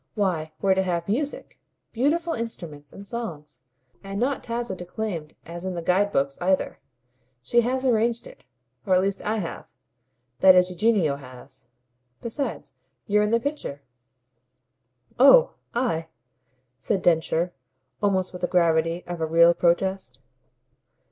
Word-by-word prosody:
Why 175 -7 -1
we're 195 -1 +3
to 190 - +1
have 175 -2 -2
music 280 +8 -3 0.3
beautiful 325 +7 0
instruments 170 -11 -6
and 200 - -11
songs; 155 - -7 0.4
and 195 0 -5
not 265 +3 0
Tasso 235 -2 -3
declaimed 180 -3 -5
as 170 +1 -8
in 185 -1 -3
the 170 - -3
guide 195 +4 +2
books 140 -3 0
either. 185 +1 0 0.6
She 240 - +3
has 255 +3 -1
arranged 235 -1 +1
it - - -14 0.4
or 185 - +2
at 185 - +4
least 195 +1 -1
I 215 +1 -1
have. 180 -6 -5 0.7
That 190 -1 +8
is 180 0 +4
Eugenio 180 -6 +2
has. 130 -1 -14 0.5
Besides, 255 +4 -5 0.3
you're 210 0 +3
in 210 - +1
the 230 +1 +3
picture." 235 - -5 1.4
"Oh 375 - +7 0.2
I!" 230 -10 0 0.7
said 190 +8 -1
Densher 170 +1 +1 0.5
almost 190 -3 +1
with 180 - -8
the 180 - +1
gravity 165 -1 +2
of 175 -2 -6
a 160 - 0
real 170 +1 +6
protest. 175 -5 0
185 Hz, 140 wpm, -25 LUFS, 165-225 Hz, 1.4 s, That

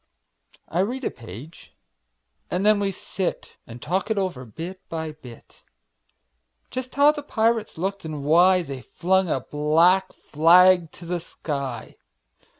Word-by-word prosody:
I 170 - -2
read 245 +8 -1
a - - -1
page, 115 - -12 0.7
and 185 +3 -1
then 215 -1 +5
we 200 -1 0
sit 190 0 -5
And 115 +1 -10
talk 185 - -2
it 220 - 0
over, 180 -10 -2
bit 170 - -8
by 160 -1 -4
bit; 125 -6 -15 1.1
Just 255 0 -6
how 285 +1 +6
the 300 -1 -6
pirates 225 - 0
looked, 195 +3 -3
and 155 -3 -6
why 175 +5 +5
They 135 -4 -7
flung 190 +4 0
a 135 - 0
black 165 +7 +2
flag 175 +2 +4
to 175 - -12
the 175 +1 -2
sky. 140 -8 -6
175 Hz, 145 wpm, -24 LUFS, 150-195 Hz, 1.1 s, how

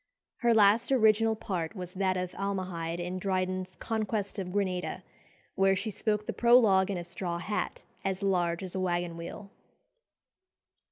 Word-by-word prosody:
Her 240 -1 +2
last 215 +4 +5
original 220 -3 +4
part 185 -3 -3
was 180 -2 -7
that 185 -1 0
of 180 -1 -3
Almahide 185 -4 -3
in 180 +1 -3
Dryden's 185 -1 -2
"Conquest 215 -2 -2
of 180 -2 -4
Granada," 185 -2 -2 0.5
where 195 0 +3
she 215 +3 -3
spoke 210 0 -1
the - - -3
prologue 220 -6 +5
in 195 - -1
a 175 - -4
straw 175 0 -4
hat 200 +5 -3 0.2
as 195 0 -2
large 175 -2 +1
as 185 - -4
a 190 - -2
waggon 175 -2 -1
wheel. 170 +4 -8
190 Hz, 155 wpm, -30 LUFS, 180-210 Hz, 0.5 s, last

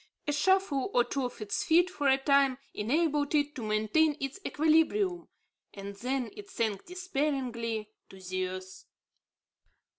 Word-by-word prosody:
A 295 - +1
shuffle 375 -1 +2
or 245 - +6
two 270 +1 -2
of 245 - -7
its 210 -1 -2
feet 345 +2 +4
for 290 -5 -1
a 265 0 +5
time, 275 -1 +3 0.2
enabled 295 +5 +1
it 290 0 +1
to 260 - -7
maintain 220 +9 +2
its 275 +6 -4
equilibrium, 325 +5 +2 0.5
and 200 0 -7
then 250 +1 -2
it 410 -1 -10
sank 220 - -2
despairingly 265 - -2 0.2
to 190 - -13
the 185 0 -2
earth. 185 0 -8
275 Hz, 145 wpm, -30 LUFS, 220-315 Hz, 0.5 s, or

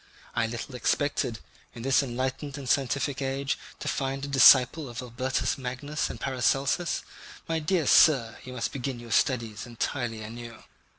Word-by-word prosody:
I 120 -1 +1
little 120 +3 -6
expected, 125 -1 0 0.4
in 115 - -8
this 135 +2 +4
enlightened 130 +2 -3
and 140 -2 -7
scientific 140 +1 0
age, 135 +1 -1 0.2
to - - -7
find 135 0 -2
a - - -6
disciple 135 +1 +6
of 120 - -7
Albertus 130 +3 -1
Magnus 130 +4 -3
and - - -7
Paracelsus. 135 +5 0 0.4
My 165 0 0
dear 160 +1 0
sir, 130 -6 +5
you 130 - -8
must 125 - -2
begin 130 -2 -4
your 120 -1 -10
studies 115 -1 0
entirely 120 -1 -3
anew." 115 +1 -9
130 Hz, 155 wpm, -27 LUFS, 120-140 Hz, 0.4 s, disciple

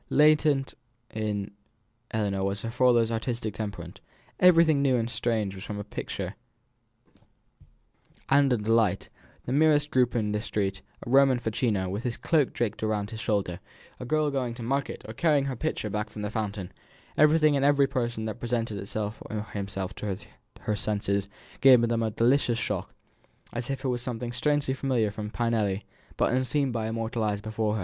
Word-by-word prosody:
Latent 150 -2 +4 0.4
in 105 -2 -2 0.6
Ellinor 100 -3 -1
was 100 +1 -2
her 115 - -3
father's 120 -2 +3
artistic 115 -1 -2
temperament; 105 -2 -6 0.4
everything 165 -5 +6
new 135 -2 +3
and 115 -2 0
strange 110 -4 -1
was 95 +1 -9
a 105 -1 -4
picture 105 - -5 1.9
and 140 0 +4
a 125 - +3
delight; 110 -2 +1 0.4
the - - -4
merest 150 +1 +3
group 125 -1 +2
in 105 -3 0
the 105 0 -1
street, 100 -3 -2 0.2
a - - -6
Roman 135 -1 +6
facchino, 110 -4 0
with 100 +4 -3
his 120 -1 -3
cloak 155 -6 +2
draped 110 -3 -2
over 110 -2 0
his 110 - -6
shoulder, 100 -6 -1 0.4
a 125 - -6
girl 155 +3 +1
going 125 -4 -2
to 120 - -7
market 135 +4 -2
or 110 - -6
carrying 145 +2 +2
her 135 -2 -2
pitcher 140 -3 -2
back 105 +1 -3
from 105 0 -7
the 105 - -3
fountain, 105 -4 -3 0.4
everything 155 0 +5
and 135 - +1
every 140 0 +5
person 120 -5 -2
that 110 +1 -4
presented 115 -3 -2
it 100 - -7
or 105 -1 -1 0.4
himself 100 -2 -4
to 100 -3 -4 0.4
her 105 - -1
senses, 100 -2 -1 0.3
gave 130 -2 +8
them 115 -1 +1
a 110 - +1
delicious 120 +2 +2
shock, - - -3 0.6
as 120 +1 -3
if 135 0 -3
it - - +1
were 125 -1 0
something 120 -1 -4
strangely 145 +2 +1
familiar 125 -5 0
from 105 0 -5
Pinelli, 110 -4 0 0.3
but - - +2
unseen 130 +2 +1
by 115 -2 -2
her - - -3
mortal 115 +1 -2
eyes 105 -1 0
before. 110 0 -1
115 Hz, 170 wpm, -27 LUFS, 105-135 Hz, 1.9 s, gave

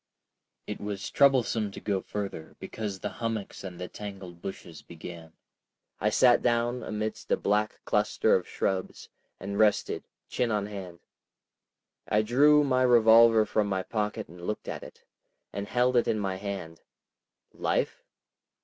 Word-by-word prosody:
It - - -6
was 100 -1 -4
troublesome 125 -6 +3
to - - -7
go 100 -2 -1
further 100 -6 -6
because 105 -3 -5
the 105 - -2
hummocks 115 -4 -3
and 90 -2 -7
the 90 - -4
tangled 95 -5 -9
bushes 85 -4 -8
began. 85 -1 -10 0.7
I 105 - +2
sat 120 +3 +5
down 120 +1 +1
amidst 110 0 -4
a - - +3
black 105 +1 0
cluster 105 +1 +2
of 90 - -1
shrubs, 95 -1 -3 0.3
and 100 +2 -4
rested, 105 -1 +2 0.2
chin 125 -2 -1
on 105 -2 0
hand. 95 -4 -8 1.1
I 105 +1 +2
drew 145 +6 +5
my 130 -2 +2
revolver 115 -2 +6
from 105 0 0
my 95 -2 -1
pocket 105 0 -3
and 85 +1 -13
looked 105 +5 -4
at - - -4
it, - - -13 0.5
and 100 0 -4
held 125 +2 +2
it 120 - +3
in 110 - +1
my 95 -2 -2
hand. 95 -5 -6 0.7
Life? - - -1
105 Hz, 150 wpm, -28 LUFS, 95-115 Hz, 1.1 s, revolver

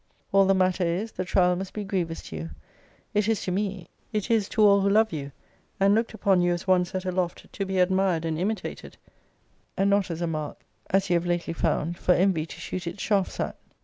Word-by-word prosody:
All 195 -1 +5
the 195 - +4
matter 185 0 +2
is, 180 +6 -1
the 185 - -3
trial 180 -1 +3
must 190 +1 -5
be 210 - -3
grievous 180 -5 -2
to - - -8
you. 80 +1 -5 0.6
It 210 0 +2
is 225 -2 0
to 185 - -2
me: 190 -2 -2 0.2
it 215 +1 -2
is 220 -3 +2
to 215 - +2
all 200 -1 +6
who 200 - +2
love 220 -1 +3
you, 140 -2 -5 0.5
and 195 +1 +5
looked 225 +1 0
upon 195 -4 +3
you 175 0 +2
as 175 - -4
one 185 -1 +4
set 185 +1 -5
aloft 180 -1 -3
to 195 - -2
be 190 0 -2
admired 185 -2 +2
and 160 -1 -2
imitated, 210 +5 -4 0.8
and 195 +1 +3
not 200 -2 +2
as 165 -1 -4
a - - +1
mark, 155 -3 -4 0.3
as 195 -1 +1
you - - +5
have 170 +1 -3
lately 175 -1 -1
found, 165 +1 -1
for 180 - +3
envy 175 -4 +2
to - - -10
shoot 185 -1 -5
its 185 - -5
shafts 200 -3 0
at. - - -2
185 Hz, 225 wpm, -26 LUFS, 175-200 Hz, 0.8 s, all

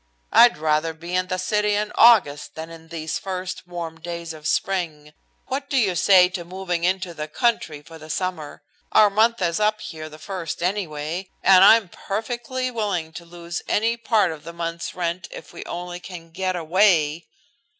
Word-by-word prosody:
"I'd 240 -6 +7
rather 155 +1 0
be 170 +2 -8
in 185 0 +1
the 185 - -2
city 210 +3 +1
in 210 +1 -1
August 195 -12 +4
than 160 +1 -7
in 165 -1 -12
these 160 -1 -4
first 185 -2 -5
warm 170 -2 -6
days 170 0 -6
of 155 -1 -7
spring. 155 -7 -2 0.3
What 275 +2 -4
do 280 - 0
you 205 -7 +3
say 180 +1 +6
to 180 -1 -5
moving 180 -1 -4
into 185 0 0
the 155 -1 -5
country 155 - -1
for 165 0 -13
the 155 +1 -12
summer? 160 -5 -4 0.3
Our 210 -1 +6
month 220 0 +2
is 170 +2 0
up 215 0 +2
here 155 -4 -7
the 155 - -12
first, 170 -2 -5
anyway, 175 -1 -3
and 190 -1 +7
I 205 - +9
am 225 -4 -1
perfectly 240 +7 -4
willing 195 -9 -2
to 175 0 -9
lose 170 0 -6
any 225 +2 +1
part 220 -5 +2
of 155 -2 -9
the 170 - -8
month's 170 0 -5
rent 170 0 -3
if - - -11
we - - -7
only 175 0 -6
can 175 -2 -10
get 185 +2 -2
away." 170 -2 +2
175 Hz, 185 wpm, -23 LUFS, 165-200 Hz, 0.3 s, I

